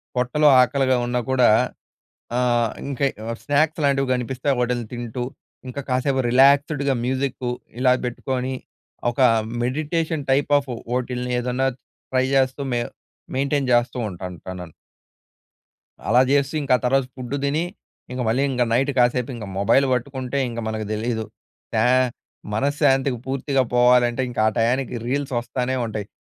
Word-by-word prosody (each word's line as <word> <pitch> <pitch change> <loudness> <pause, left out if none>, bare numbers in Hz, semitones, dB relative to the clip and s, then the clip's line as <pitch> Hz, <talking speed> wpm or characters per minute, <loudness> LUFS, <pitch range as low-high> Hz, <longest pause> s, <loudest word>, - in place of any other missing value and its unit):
పొట్టలో 125 +5 +2
ఆకలిగా 130 0 +2
ఉన్నా 125 0 0
కూడా, 125 -3 +5 0.9
ఆహ్, 120 -2 +2 0.2
ఇంక 140 0 0 0.2
ఆహ్, 115 - -3
స్నాక్స్ 155 +2 +1
లాంటివి 135 -1 +1
కనిపిస్తే 125 +2 -2
వోటిలిని 120 -2 -1
తింటూ, 120 0 -4 0.4
ఇంక 125 +2 -5
కాసేపు 130 +1 +1
రిలాక్స్డ్‌గా 140 +2 +4
మ్యూజిక్కు, 130 -1 -1 0.3
ఇలా 125 -1 +5
బెట్టుకోని, 130 +1 -3 0.6
ఒక 120 - -2 0.4
మెడిటేషన్ 155 +3 -1
టైప్ 140 +2 +1
ఆఫ్ 135 -1 -10 0.2
వోటిలిని 125 0 -2
ఏదన్నా 125 +2 0 0.4
ట్రై 130 0 +2
జాస్తూ, 130 +1 +2
మేవ్ 120 0 -1 0.5
మెయింటైన్ 140 0 0
జేస్తూ 120 +1 +2
ఉంటాను. 90 -1 -7
టనన్ 90 -3 -7 1.3
అలా 120 +3 +5
చేస్తూ, 140 0 +2
ఇంకా 130 -2 +3
తర్వాత 135 +1 +2
ఫుడ్ 130 +1 -5
తిని, 150 +4 +1 0.5
ఇంగ 125 0 -3
మళ్ళీ 125 +5 +2
ఇంగ 125 -2 +1
నైట్ 135 +4 +2
కాసేపు 125 +1 +2
ఇంగ 115 -3 -7
మొబైల్ 135 +7 +4
పట్టుకుంటే, 130 +1 -3
ఇంగ 115 - -5
మనకు 110 0 -3
దెలీదు. 110 +1 -2 0.5
త్యా - - +3 0.7
మనశ్శాంతికి 135 +1 +1
పూర్తిగా 135 0 0
పోవాలంటే, 125 0 +4
ఇంకా 120 - -2
ఆ - - -6
టయానికి, 125 +3 +1
రీల్స్ 140 +1 -2
వస్తానే 125 +2 -2
ఉంటాయి. 110 -3 -5
130 Hz, 135 wpm, -22 LUFS, 120-135 Hz, 1.3 s, కూడా